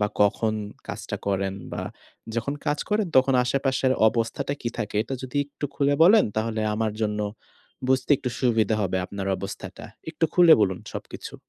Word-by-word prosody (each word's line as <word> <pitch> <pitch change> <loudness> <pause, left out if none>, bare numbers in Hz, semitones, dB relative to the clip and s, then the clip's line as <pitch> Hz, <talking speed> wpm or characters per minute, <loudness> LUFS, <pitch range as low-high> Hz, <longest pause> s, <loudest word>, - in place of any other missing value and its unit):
বা 105 - +3
কখন 110 +2 +3 0.3
কাজটা - - -5
করেন 95 -1 0 0.2
বা - - -3 0.5
যখন 120 +5 -1
কাজ 150 - +1
করেন 210 -1 +1
তখন 130 0 +5
আশেপাশের 130 0 +1 0.2
অবস্থাটা 115 +5 -2
কী 120 - -1
থাকে 105 -3 -4
এটা 135 - -5
যদি 130 +2 -6
একটু 145 - -7
খুলে 140 0 +2
বলেন, 210 +6 +7
তাহলে 110 0 -1
আমার 110 -1 -1
জন্য 105 -1 0 0.7
বুঝতে 130 +2 +1
একটু 125 - -4
সুবিধা 115 -4 +2
হবে 95 -1 0
আপনার 100 -1 -5
অবস্থাটা। 100 0 -7 0.3
একটু 160 0 -1
খুলে 175 -3 +8
বলুন 95 -3 +1 0.2
সবকিছু। - - -7
115 Hz, 160 wpm, -25 LUFS, 105-140 Hz, 0.7 s, খুলে